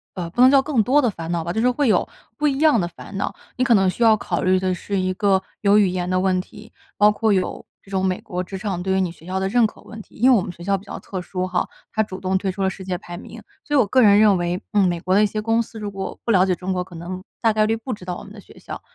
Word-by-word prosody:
呃， 175 -2 -4
不 240 - 0
能 255 - +8
叫 275 0 +6
更 265 -5 +1
多 260 +7 +3
的 245 - +2
烦 165 -3 -6
恼 170 -1 -1
吧， 170 +1 -3
就 220 - 0
是 250 - +4
会 260 +2 +1
有 200 -5 +2 0.3
不 300 - +1
一 275 -2 0
样 300 - +4
的 175 - -1
烦 195 - -11
恼。 200 - -2 0.2
你 255 - +2
可 245 -2 +4
能 195 -2 +3
需 235 - -6
要 220 -2 +6
考 - - -2
虑 185 0 +3
的 185 -1 0
是 195 +2 -3
一 185 0 0
个 190 0 +2 0.2
有 205 0 +4
语 205 -2 +5
言 180 0 -3
的 185 - +1
问 185 -1 +1
题， 215 +4 -14 0.3
包 210 0 +6
括 220 +1 0
有 185 -2 -1 0.2
这 195 - -17
种 190 -1 0
美 185 -1 0
国 180 0 -4
职 190 +1 -7
场 190 -3 -3
对 190 +1 -1
于 - - +2
你 180 - -1
学 165 - -18
校 190 +1 -2
的 190 - -1
认 225 +2 +3
可 - - -16
问 220 -1 -10
题。 - - -20
因 255 +4 +4
为 - - +7
我 205 - +3
们 180 - -5
学 170 - -12
校 200 +2 +1
比 195 - -6
较 - - -8
特 185 -2 -6
殊 185 0 -3
哈， 180 -1 -1 0.2
它 220 - +1
主 190 -3 -4
动 190 0 -1
退 190 -1 -2
出 195 +1 -4
了 190 - +2
世 190 - -8
界 185 -1 -3
排 175 -2 -9
名， - - -10 0.2
所 295 - 0
以 - - +6
我 230 - +4
个 255 +5 +3
人 205 -2 +6
认 210 -2 +5
为， 175 +1 -1
嗯， 200 -3 +4
美 175 -1 -1
国 185 +2 -1
的 205 - +5
一 210 - +4
些 215 +1 -4
公 225 +2 +1
司 225 -1 -8
如 205 -1 -5
果 195 -1 -6
不 230 - +1
了 185 -2 +5
解 185 -1 +1
中 185 +1 -3
国， 180 - -1
可 180 -1 -14
能 180 +3 -7 0.2
大 225 -2 +2
概 215 0 +2
率 225 +1 0
不 235 +2 -5
知 205 - -9
道 180 -1 -4
我 - - -10
们 200 - -12
的 210 - -11
学 - - -18
校。 - - -8
195 Hz, 355 characters per minute, -22 LUFS, 185-220 Hz, 0.3 s, 能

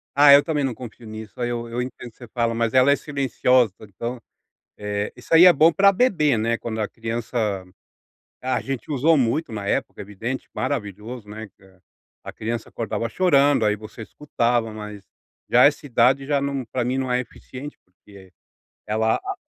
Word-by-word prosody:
Ah 145 0 +8
eu 140 +1 +7
também 150 -3 -1
não 135 -2 -1
confio 115 0 -11
nisso, 110 +1 -10
aí 120 -1 -1
eu 120 -1 -4
eu 120 +1 -3
entendo 125 -1 -7
que - - -35
você 120 - -11
fala, 115 0 -1
mas 115 -1 -1
ela 130 +2 +5
é 140 - +5
silenciosa, 130 -6 +1
então, 115 +4 -6 0.6
eh, 105 0 -3
isso 125 - -12
aí 165 - +9
é 180 - +9
bom 160 +2 +5
pra 200 +3 +5
bebê, 175 - +2
né, 115 +1 0
quando 110 -1 -5
a 105 - -1
criança, 115 +1 -5 1.1
a 130 -1 0
gente 135 +1 -5
usou 150 +3 +3
muito 125 +2 0
na 105 -2 -5
época, - - -2
evidente, 110 +6 -5
maravilhoso, 110 -3 -4
né, 110 +1 -8
que 95 - -31 0.6
a - - -7
criança 115 +1 -4
acordava 115 0 -3
chorando, 140 -5 +3
aí 105 0 +2
você 110 +2 -10
escutava, 120 -3 -1
mas 105 -2 -9 0.4
já 125 +1 +6
essa 145 0 +3
idade 130 +1 +2
já 145 -1 +1
não 140 -1 -2
pra 120 +1 -3
mim 125 +2 -1
não 130 -1 -1
é 125 - +2
eficiente 130 +3 -10
porque 95 0 -18 0.6
ela 110 +1 +1
a 390 0 -5
120 Hz, 185 wpm, -23 LUFS, 110-140 Hz, 1.1 s, aí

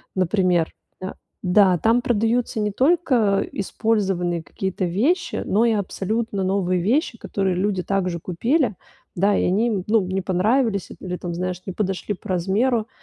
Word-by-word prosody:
например, 180 -2 +1 0.3
да? 185 - -5 0.3
Да, 185 0 +4
там 230 +6 +3
продаются 230 -1 0
не 210 -1 0
только 255 - +2
использованные 195 -5 -1
какие-то 190 +3 -3
вещи, 250 - 0
но 220 +4 +2
и 230 - +3
абсолютно 205 0 -2
новые 185 -2 +1
вещи, 245 - +1
которые 195 -4 -1
люди 190 0 0
так 195 -2 0
же 170 -1 -4
купили, 230 - 0 0.4
да, 200 +3 +3
и - - +1
они 205 +6 +2
им, 200 -6 -1
ну, 220 -1 +4
не 190 +1 -2
понравились 200 +3 +1
или, 180 -1 -4
там, 175 -1 -5
знаешь, 180 0 -3
не 190 - -5
подошли 195 +1 -2
по - - -13
размеру. 215 +6 +1
195 Hz, 155 wpm, -22 LUFS, 185-225 Hz, 0.4 s, Да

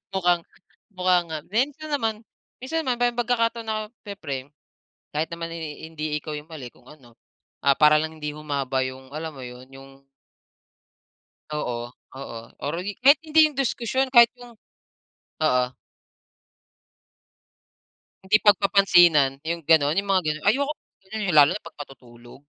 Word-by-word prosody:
Mukhang 175 -2 +2 0.5
mukha 180 -1 +2
nga. 160 - -3
Minsan 290 +7 -1
naman 225 -5 -1 0.4
minsan 320 +5 -2
naman 245 -2 -1
may 245 0 +2
pagkakataon 235 -1 0
na 215 -1 -2 0.2
siyempre, 145 -9 -6 0.6
kahit 155 +1 -1
naman 165 0 -5
eh 160 -1 -7
hindi 155 -1 -3
ikaw 155 +1 -7
'yung 150 +3 -11
mali 140 -6 -8
kung - - -23
ano, 125 -6 -17 0.5
ah 140 0 +4
para 150 0 +6
lang 160 0 -6
hindi 150 0 -4
humaba 140 -3 -2
'yung, 130 0 -8
alam 160 0 -5
mo 130 - -9
yun, 125 +1 -11
'yung 135 0 -13 1.6
Oo, 150 -5 -3 0.4
oo. 115 -4 -7 0.3
Or 145 - -2
eh 205 - -3
kahit 280 +3 +7
hindi 315 0 +3
'yung 285 - -16
diskusyon 260 0 -1
kahit 235 -2 +8
'yung 245 -1 -13 0.9
oo. 125 -4 +3 2.6
Hindi 200 +3 +4
pagpapansinan, 180 -8 +5
'yung 165 +1 -4
gano'n, 155 0 +4
'yung 200 - +1
mga 190 - +3
gano'n, 155 0 -4
ayoko 275 +8 +2
ng - - -77
gano'n, 220 +2 -4
'yung 175 -5 +1
lalo 145 -1 +8
na - - -28
pag - - -11
matutulog. 120 -3 -14
165 Hz, 150 wpm, -24 LUFS, 145-225 Hz, 2.6 s, kahit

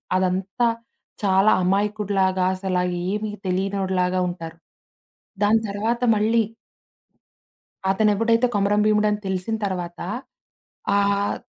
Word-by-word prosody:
అదంతా 190 +5 0 0.6
చాలా 195 +2 +4
అమాయకుడిలాగా 195 -1 +1
అసలా 185 -1 -1 0.3
ఏమి 210 +2 -2
తెలియనోడిలాగా 185 -1 0
ఉంటారు. 165 -2 -7 0.9
దాని 220 +2 +4
తర్వాత 220 +4 -1
మళ్ళీ 225 +2 +2 1.5
అతనెప్పుడైతే 220 +4 +2
కొమరం 205 +1 +2
భీముడని 210 -1 +2
తెలిసిన 190 +4 -2
తర్వాత 175 -3 -4 1.0
ఆహ్, 200 0 +1
200 Hz, 85 wpm, -23 LUFS, 185-210 Hz, 1.5 s, చాలా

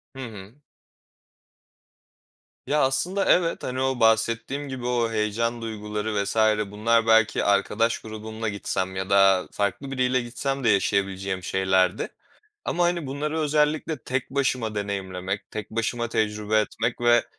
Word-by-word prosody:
Hı - - -9
hı. 105 +1 -11 2.1
Ya, 150 +1 +2
aslında, 180 +9 +1
evet, 170 -2 +2
hani, 130 +1 -3
o 130 -1 0
bahsettiğim 115 +5 +1
gibi 130 -2 -5
o 120 -2 +1
heyecan 115 +2 -1
duyguları 105 -1 -3
vs. 100 - -4 0.4
bunlar 115 +2 +2
belki 115 0 +4
arkadaş 105 +3 +2
grubumla 110 0 -5
gitsem 95 -2 -3
ya 95 +1 -3
da 95 -2 +5
farklı 135 +7 -2
biriyle 130 -1 +1
gitsem 135 +3 -3
de 115 - +3
yaşayabileceğim 95 -2 0
şeylerdi 95 +1 +1 0.6
ama, 175 - +1
hani, 175 -4 0
bunları 150 +4 -2
özellikle 150 0 +1
tek 130 0 -2
başıma 130 -5 0
deneyimlemek, 95 -1 -4
tek 110 -1 -6
başıma 115 +1 -1
tecrübe 105 0 +1
etmek 115 +3 -2
ve 120 0 +4
115 Hz, 130 wpm, -25 LUFS, 100-130 Hz, 2.1 s, da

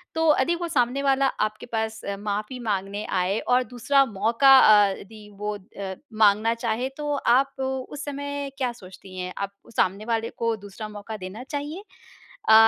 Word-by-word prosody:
तो 320 -1 +4
यदि 300 +6 +2
वो 345 0 -3
सामने 255 -3 +1
वाला 275 0 +3 0.2
आपके 215 0 -11
पास 220 -1 -3
अ, 200 0 -3
माफ़ी 210 +4 -3
माँगने 205 -2 -2 0.2
आए 190 +4 +1
और 250 +1 +2
दूसरा 250 +3 +2
मौका 230 +5 +5
अ, 205 -4 +6
यदि 210 +1 -13
वो 210 0 -2
अ, 195 -1 -7 0.3
माँगना 215 +2 +4
चाहे 235 +3 0
तो 295 -1 -2
आप 270 +1 +2
उस 265 +2 -4
समय 285 0 -4
क्या 255 -3 0
सोचती 185 0 -12
हैं 180 0 -4
आप 200 0 -3 0.2
सामने 200 +4 +1
वाले 230 -1 -1
को 230 -1 0
दूसरा 205 +2 -8
मौका 210 +1 -7
देना 195 +6 -7
चाहिए? 295 +7 -5 0.7
अ, - - +8
225 Hz, 170 wpm, -25 LUFS, 205-270 Hz, 0.7 s, अ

